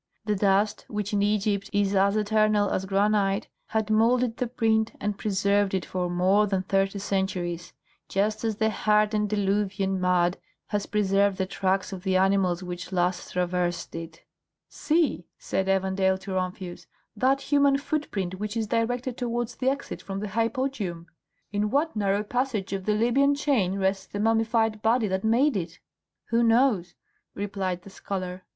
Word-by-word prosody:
The 210 -1 +1
dust, 200 +1 +2
which 210 -1 -4
in 205 - +2
Egypt 205 -1 0
is 200 -1 +1
as 200 +1 +3
eternal 215 -1 +2
as 190 - -1
granite, 200 +1 +1 0.2
had 220 -1 -1
moulded 235 +2 +3
the 250 - -1
print 225 -2 +1
and 205 0 -2
preserved 200 -1 +1
it 180 -4 -2
for 180 -1 -2
more 190 +4 +3
than 190 -2 0
thirty 195 +1 0
centuries, 180 -3 -2 0.4
just 210 +3 0
as 220 -2 0
the 220 +1 +1
hardened 210 0 +2
diluvian 195 -2 0
mud 180 0 +2 0.3
has 205 -1 -2
preserved 200 -1 +2
the 190 - 0
tracks 190 0 -1
of 185 - -6
the 190 -1 +1
animals 190 -2 +2
which 180 0 -6
last 180 -1 -1
traversed 180 -1 -1
it. 165 0 -8 0.5
"See," 300 - 0
said 190 0 -2
Evandale 190 0 +2
to 195 0 -7
Rumphius, 185 -1 -4 0.3
"that 260 +5 +2
human 280 -1 +5
footprint 205 - -3
which 210 +2 -3
is 225 - 0
directed 240 +3 -1
towards 240 -1 -2
the 260 - +1
exit 280 +1 -4
from 195 0 -5
the 210 0 -4
hypogeum! 225 -5 -2 0.5
In 210 +1 0
what 295 +5 0
narrow 200 0 +1
passage 225 -4 -2
of 190 -1 -3
the 210 - +2
Libyan 265 +6 +3
chain 245 -11 +1
rests 190 0 0
the 205 - -6
mummified 225 0 +1
body 225 0 +2
that 190 0 -2
made 245 +6 +3
it?" 170 -3 -4 0.5
"Who 230 +1 +2
knows?" 225 -6 +3 0.4
replied 190 -3 -3
the 195 - -12
scholar. 185 -2 -5
205 Hz, 160 wpm, -26 LUFS, 190-220 Hz, 0.5 s, human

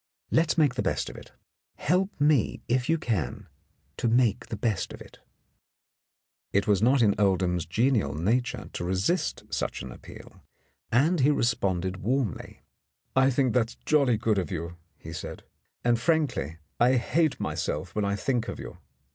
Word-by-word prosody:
Let's 165 0 +2
make 150 -5 +4
the 125 - -2
best - - -1
of - - -14
it; - - -12 0.4
help 185 +4 0
me, 145 -4 +2
if 125 +2 0
you 165 - +4
can, 110 - -2 0.5
to - - 0
make 115 -2 +2
the 110 - -5
best 105 -2 -1
of - - -10
it." - - -14 1.3
It 100 -1 +2
was 100 -2 +2
not 125 +2 +4
in 105 -2 +4
Oldham's 90 -4 +1
genial 110 - +1
nature 120 +10 0
to - - -4
resist 95 - 0
such - - -2
an 65 - -7
appeal, - - -13 0.5
and 155 +9 +3
he 135 +2 +4
responded 95 -9 0
warmly. 120 - -2 0.5
"I 130 0 +5
think 130 -2 +1
that 115 -3 +2
is - - -11
jolly 140 -7 +3
good 110 -2 +1
of 90 - -3
you," 85 -1 -4 0.2
he 80 - -9
said, - - -7 0.4
"and, 120 -1 +3
frankly, 125 - 0 0.2
I 125 +2 +5
hate 155 +5 +1
myself 85 +5 -3
when 105 - 0
I 100 0 0
think 120 +2 -1
of - - -5
you. - - -9
115 Hz, 165 wpm, -27 LUFS, 95-135 Hz, 1.3 s, I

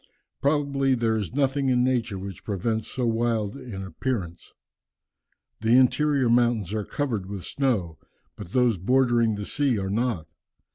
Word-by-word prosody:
Probably 140 -2 +2
there 115 -2 +1
is 110 +2 -3
nothing 135 -1 +1
in 125 -1 +3
nature 120 -5 0
which 95 0 -8
presents 110 +2 -2
so 125 - -2
wild 115 -2 0
an 120 -8 -7
appearance. 95 -2 -4 1.1
The 115 +3 +4
interior 140 +1 +3
mountains 115 -5 +2
are 110 -1 -1
covered 115 -7 -3
with 100 -3 -6
snow, 110 - -1 0.4
but 85 - -10
those 120 -5 +2
bordering 120 +1 +2
the 105 0 -5
sea 140 -2 0
are 95 -1 -2
not. 115 -6 -1
115 Hz, 145 wpm, -25 LUFS, 100-130 Hz, 1.1 s, The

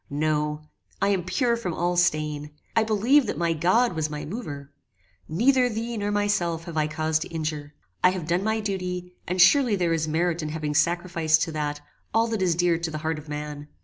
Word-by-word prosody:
No. 150 +1 -1 0.4
I 195 - +2
am 190 -3 +1
pure 235 - +1
from 185 -8 -4
all 175 +1 0
stain. 150 -4 +1 0.3
I 225 - +4
believed 225 +5 +3
that - - -3
my 170 -1 +1
God 185 +9 +2
was 160 -2 -1
my 150 0 -5
mover! 145 - -6 0.6
"Neither 250 - +3
thee 230 +1 -3
nor 205 -1 -2
myself 205 -5 0
have 170 -2 -8
I 155 -1 +1
cause 155 0 0
to 160 - -5
injure. 155 -2 -4 0.3
I 180 - +7
have 185 -3 -3
done 175 +3 0
my 220 +1 0
duty, 180 -3 -4
and 180 +1 -2
surely 235 +5 +6
there 175 -3 +1
is 160 -1 0
merit 170 +2 0
in 155 - -3
having 150 -1 -3
sacrificed 165 0 +2
to 165 - -3
that, 150 -1 -3 0.3
all 225 +1 +4
that 220 -3 -2
is 175 -3 +2
dear 175 -1 +2
to 170 -1 -2
the 155 - -4
heart 160 -1 -1
of 150 0 -13
man. 150 0 -5
170 Hz, 210 wpm, -25 LUFS, 155-200 Hz, 0.6 s, I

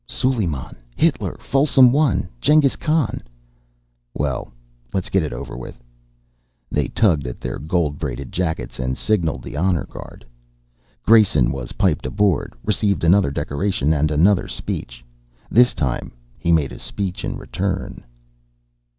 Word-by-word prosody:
"Suleiman. 95 - -1 0.2
Hitler. - - 0
Folsom 135 -2 +4
I. 145 -8 +2 0.2
Jenghis 150 -3 +4
Khan." 155 -5 0 0.9
"Well, 65 -3 -2 0.4
let's 95 - -2
get 95 - +3
it 75 - -3
over - - -6
with." 65 - -9 0.9
They - - 0
tugged 80 - +2
at 60 - -6
their 65 - -5
gold 80 -2 -1
braided 70 -3 -5
jackets 80 -10 -3
and 65 0 -2
signalled 90 -7 0
the - - -8
honor 90 +2 +1
guard. - - -11 0.8
Grayson 95 - +5
was 65 -3 -5
piped - - +1
aboard, 100 +2 0
received 100 -4 +1
another 90 0 +4
decoration 75 +2 -1
and 75 0 +1
another 90 +6 +3
speech. - - -5 0.5
This 125 +2 +5
time 65 -5 -2 0.3
he 85 - 0
made 75 -5 +2
a - - -9
speech 95 -3 -3
in - - -3
return. 95 0 -4
85 Hz, 135 wpm, -21 LUFS, 70-105 Hz, 0.9 s, Grayson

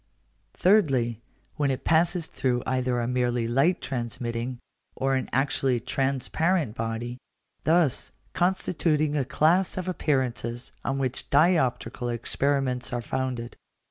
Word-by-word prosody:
Thirdly, 135 - +3 0.4
when 145 -2 +1
it 130 - -2
passes 170 +1 +2
through 125 -2 -1
either 130 -1 0
a 120 - -1
merely 125 -2 0
light 135 +10 +2
transmitting 120 0 -3 0.4
or 135 0 0
an 130 - -1
actually 135 -1 +1
transparent 135 - 0
body; 115 +2 -4 0.5
thus 160 -4 +2 0.2
constituting 165 -4 +1
a 145 - +2
class 170 +9 +2
of 185 -1 -3
appearances 125 -8 -1
on 135 - -1
which 130 -2 -2
dioptrical 140 -5 +2
experiments 130 +1 -1
are 120 -1 -2
founded. 125 -2 -3
130 Hz, 115 wpm, -26 LUFS, 120-155 Hz, 0.5 s, Thirdly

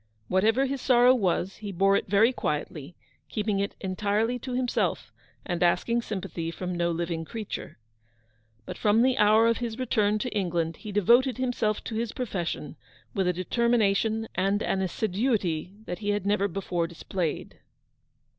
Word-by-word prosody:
Whatever 220 +8 +3
his 275 -1 -3
sorrow 250 -1 +5
was, 190 -4 0
he 205 -2 -6
bore 195 +2 +3
it - - 0
very 215 +6 +4
quietly, 150 - -4 0.3
keeping 210 -2 -1
it 200 +1 -2
entirely 205 +5 0
to 255 +1 -6
himself, 250 -1 -1 0.3
and 175 -1 -3
asking 230 +7 +2
sympathy 185 -6 -4
from 180 +1 -4
no 170 0 +1
living 170 -1 -2
creature. 215 +5 -6 0.9
But - - -7
from 215 +2 +4
the 260 0 +3
hour 215 +2 +5
of 230 0 +3
his 235 -2 -4
return 215 -4 +1
to 235 +1 -4
England, 170 -4 -1
he 215 - -8
de 205 +1 +1
voted 245 +6 +4
himself 240 -5 -1
to - - -6
his 225 0 -2
profession 195 -9 -4 0.4
with 195 -5 0
a - - +4
determina 220 +3 +2
tion 225 +2 -1
and 195 +2 +1
an 190 - 0
assiduity 190 -3 -1
that 175 - -5
he 205 -1 -3
had 205 -1 0
never 200 0 +2
before 175 -3 -2
displayed. 170 0 -4
205 Hz, 165 wpm, -27 LUFS, 180-230 Hz, 0.9 s, sorrow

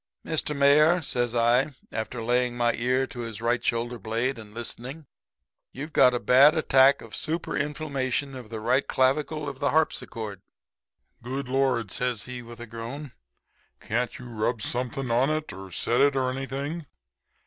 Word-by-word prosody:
"'Mr. 155 -1 -1
Mayor,' 150 +5 +5
says 120 -3 -1
I, 120 +4 +3 0.2
after 115 +1 -4
laying 125 +1 +1
my 120 -1 +2
ear 130 +2 +1
to 125 - -10
his 115 -3 -5
right 120 +1 0
shoulder 120 +1 -1
blade 115 +3 -1
and 105 -2 -11
listening, 125 +6 -7 0.7
'you've 150 +4 -7
got 125 -1 +6
a - - 0
bad 140 +7 +6
attack 135 -3 +5
of - - -9
super 165 +1 -3
inflammation 140 -2 -2
of 125 -4 -9
the 110 -1 -5
right 130 +5 +1
clavicle 150 +3 +1
of 140 -2 -6
the 145 - +1
harpsichord!' 110 - -1 0.8
"'Good 130 +3 -4
Lord!' 130 -5 +1
says 125 -4 -1
he, 125 -1 -7
with 120 0 -11
a 120 - -6
groan, 120 +5 -7 0.7
'Can't 120 +2 -2
you 125 - -10
rub 115 -1 -2
something 125 +2 -2
on 125 +4 +3
it, 155 0 -2
or 95 0 -9
set 115 +8 +1
it 140 0 +4
or 130 -1 +1
anything?' 140 +4 -4
125 Hz, 165 wpm, -26 LUFS, 120-140 Hz, 0.8 s, got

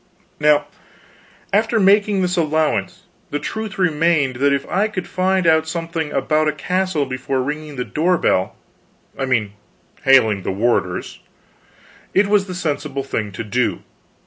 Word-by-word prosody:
Now 150 -1 +4 0.9
after 225 +2 +2
making 200 0 +3
this 180 0 0
allowance, 155 - 0 0.3
the 145 - -2
truth 220 +8 -5
remained 160 -6 +2
that 140 +2 +2
if 140 -1 0
I 200 +4 +1
could 190 -4 -5
find 185 0 0
out 160 -1 +3
something 165 -2 -3
about 155 +3 +1
a 155 - +1
castle 180 0 -1
before 130 0 -2
ringing 150 +1 -5
the 125 -1 -3
door 175 +4 +1
bell 95 - +1 0.6
I 135 - -2
mean 110 -6 0 0.5
hailing 125 -8 +4
the - - -4
warders 95 -3 -1 1.0
it 200 - +5
was 200 -1 +2
the 185 - -6
sensible 145 -5 -3
thing 110 -6 -3
to 105 - -5
do. 120 +3 -1
155 Hz, 145 wpm, -20 LUFS, 130-185 Hz, 1.0 s, it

